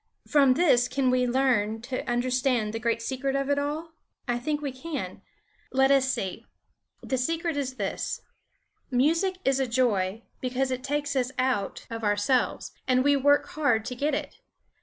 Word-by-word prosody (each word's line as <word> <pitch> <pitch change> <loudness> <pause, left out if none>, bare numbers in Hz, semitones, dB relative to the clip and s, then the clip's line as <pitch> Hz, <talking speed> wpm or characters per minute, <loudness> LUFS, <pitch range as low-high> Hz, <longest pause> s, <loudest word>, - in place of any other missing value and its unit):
From 275 -4 +5
this 255 -7 +4
can 255 0 +1
we 250 0 +2
learn 240 -4 +1
to 255 +1 -3
understand 245 -2 +1
the 225 - -3
great 230 -1 -1
secret 270 +2 -2
of 275 +1 0
it 285 - +2
all? 305 +3 -3 0.4
I 240 0 0
think 295 +4 -1
we 285 -2 -3
can. 285 +4 -6 0.5
Let 265 +1 +4
us 270 -1 +4
see! 190 -7 -4 0.6
The 260 - -1
secret 330 +4 -1
is 265 -2 -2
this: 200 -5 -3 0.7
Music 325 +9 +2
is 270 0 +3
a 265 - +1
joy 225 -4 +1 0.2
because 260 +1 -1
it 255 0 -3
takes 285 0 -1
us 255 -1 0
out 255 -6 -1
of 225 0 -5
ourselves 205 +5 +1 0.2
and 255 0 +3
we 285 0 +4
work 285 +1 +3
hard 280 -8 +1
to 250 - -4
get 285 +3 0
it. - - -5
260 Hz, 170 wpm, -27 LUFS, 245-285 Hz, 0.7 s, From